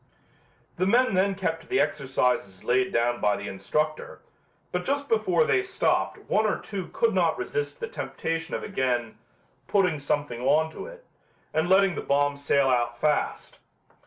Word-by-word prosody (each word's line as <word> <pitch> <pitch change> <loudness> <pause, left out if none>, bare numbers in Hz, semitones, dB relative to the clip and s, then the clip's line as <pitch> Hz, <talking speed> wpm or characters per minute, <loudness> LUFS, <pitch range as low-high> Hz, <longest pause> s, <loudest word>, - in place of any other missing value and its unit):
The 185 - +1
men 245 +2 +3
then 195 +1 +2
kept 165 -4 -2
to - - -18
the 195 - +1
exercises 125 - 0
laid 125 +1 +2
down 120 +1 +1
by 105 -1 +3
the - - -6
instructor, 150 +11 -2 0.5
but 180 0 -2
just 280 +4 -1
before 200 - +2
they 385 - +2
stopped 375 -1 0
one 215 +1 +2
or 210 - 0
two 195 -3 -6
could 465 - +1
not - - +2
resist 445 +2 -3
the 465 - -3
temptation 165 - -4
of - - -4
again 125 - -1 0.5
"putting 180 -7 +2
something 145 -4 -2
on 155 +5 +2
to - - -8
it" - - -13 0.5
and 160 +3 +1
letting 190 0 +5
the - - -4
bomb 145 0 +1
sail 140 -1 +2
out 120 -2 +1
fast. 150 +1 -1
160 Hz, 165 wpm, -26 LUFS, 130-195 Hz, 0.5 s, letting